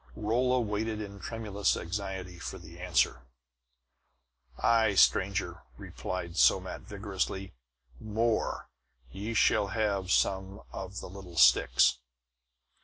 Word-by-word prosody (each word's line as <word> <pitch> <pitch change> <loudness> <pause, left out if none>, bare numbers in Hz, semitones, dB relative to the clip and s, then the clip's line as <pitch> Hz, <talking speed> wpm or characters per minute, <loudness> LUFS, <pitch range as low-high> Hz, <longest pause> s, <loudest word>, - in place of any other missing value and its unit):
Rolla 125 +4 +1
waited 110 -1 -2
in 100 -1 -7
tremulous 105 0 -1
anxiety 95 -1 -5
for - - -6
the 85 +2 -13
answer. 90 -7 +1 1.4
"Aye, 110 -3 +3
stranger!" 95 -2 +2 0.2
replied 85 -2 -6
Somat - - +3
vigorously. 95 -1 -4 0.5
"More; 110 +1 -1 0.4
ye 105 - -5
shall 105 -1 +3
have 100 -2 -1
some 95 +1 +1
of 95 0 -6
the - - -7
little 90 -2 -11
sticks!" - - +5
100 Hz, 105 wpm, -30 LUFS, 95-110 Hz, 1.4 s, sticks